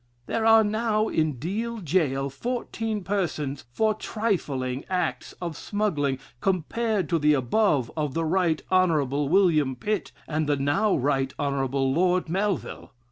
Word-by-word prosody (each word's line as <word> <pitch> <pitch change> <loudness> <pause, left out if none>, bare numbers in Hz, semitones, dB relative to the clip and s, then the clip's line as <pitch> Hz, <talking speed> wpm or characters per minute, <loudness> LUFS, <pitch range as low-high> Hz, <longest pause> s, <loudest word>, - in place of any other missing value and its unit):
"There 225 - 0
are 225 0 +7
now 215 0 0
in 155 -1 +1
Deal 210 - -3
jail 145 -7 0
fourteen 225 - -3
persons 160 -9 -2
for 215 - +2
trifling 150 - -2
acts 180 -3 -2
of 170 -3 -6
smuggling 150 -10 -1 0.2
compared 195 - 0
to 165 - +2
the 150 0 +4
above 135 - +1
of 150 -4 -2
the 165 0 0
Right 170 -1 +1
Honorable 150 -6 +2
William 160 -7 +3
Pitt 210 +11 -2 0.2
and 155 -1 -1
the 145 - +3
now 145 +10 +2
Right 135 0 0
Honorable 135 -2 0
Lord 180 +1 +2
Melville. 195 0 -2
165 Hz, 135 wpm, -26 LUFS, 140-205 Hz, 0.2 s, are